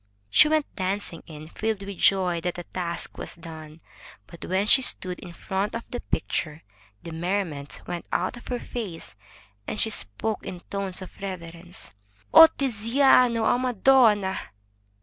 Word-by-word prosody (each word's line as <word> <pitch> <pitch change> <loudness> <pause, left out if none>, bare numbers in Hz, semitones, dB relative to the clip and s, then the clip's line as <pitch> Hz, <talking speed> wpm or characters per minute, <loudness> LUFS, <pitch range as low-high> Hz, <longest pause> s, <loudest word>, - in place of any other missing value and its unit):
'' 100 +1 -41
She 300 - +7
went 310 -1 +2
dancing 190 -3 -2
in, 155 -1 -10
filled 215 +1 -2
with 200 -1 -7
joy 180 -3 +3
that 180 0 -2
the 175 - -6
task 170 -1 -5
was - - -4
done, 160 -2 -11 0.4
but 170 - -11
when 190 +2 0
she 265 +5 +7
stood 185 -7 0
in 175 - -9
front 195 +5 -3
of 230 - -4
the 245 - -3
picture, 155 -8 -3 0.4
the 170 - -7
merriment 165 -4 -3
went 175 -2 -5
out 185 +7 0
of 240 - -13
her 250 - -2
face, 205 -11 -7 0.5
and - - -4
she 220 - +2
spoke 205 - -2
in 180 -1 -7
tones 195 -1 -3
of 185 - -14
reverence: 175 -2 -7 0.4
"Oh, 325 - +11
Tiziano, 250 -2 +3
a 245 - +3
madonna!'' 230 -5 +3
190 Hz, 160 wpm, -25 LUFS, 170-225 Hz, 0.5 s, Oh